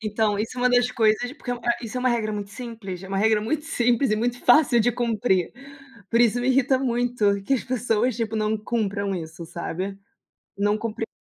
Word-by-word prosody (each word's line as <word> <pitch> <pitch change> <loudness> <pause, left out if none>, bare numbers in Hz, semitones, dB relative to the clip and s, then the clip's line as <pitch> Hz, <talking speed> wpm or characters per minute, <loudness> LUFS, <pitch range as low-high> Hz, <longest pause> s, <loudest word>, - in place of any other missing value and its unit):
Então, 215 -1 0
isso 225 +4 -3
é - - -3
uma 250 0 +3
das 245 0 +4
coisas 230 +2 +1
porque, 280 -4 -8
eh, 240 -1 -1
isso 230 +2 -6
é - - -3
uma 255 - +2
regra 225 -3 0
muito 205 -1 -5
simples, 210 -6 -7
é 190 - -9
uma 195 - -2
regra 215 0 +3
muito 295 +8 -2
simples 245 -5 +1
e - - +2
muito 245 +2 -1
fácil 250 -1 +5
de 240 +2 +2
cumprir. 225 -6 0 0.6
Por 230 - +2
isso 240 0 +4
me 245 - -2
irrita 265 0 +3
muito 240 -5 0
que 270 +8 +1
as 255 - -2
pessoas, 245 -1 0
tipo, 225 -2 -2
não 215 0 0
cumpram 205 -3 -2
isso, 170 -1 -6
sabe, 185 +4 -5 0.6
não 205 +1 +2
cumpre 225 0 -4
225 Hz, 210 wpm, -24 LUFS, 205-245 Hz, 0.6 s, fácil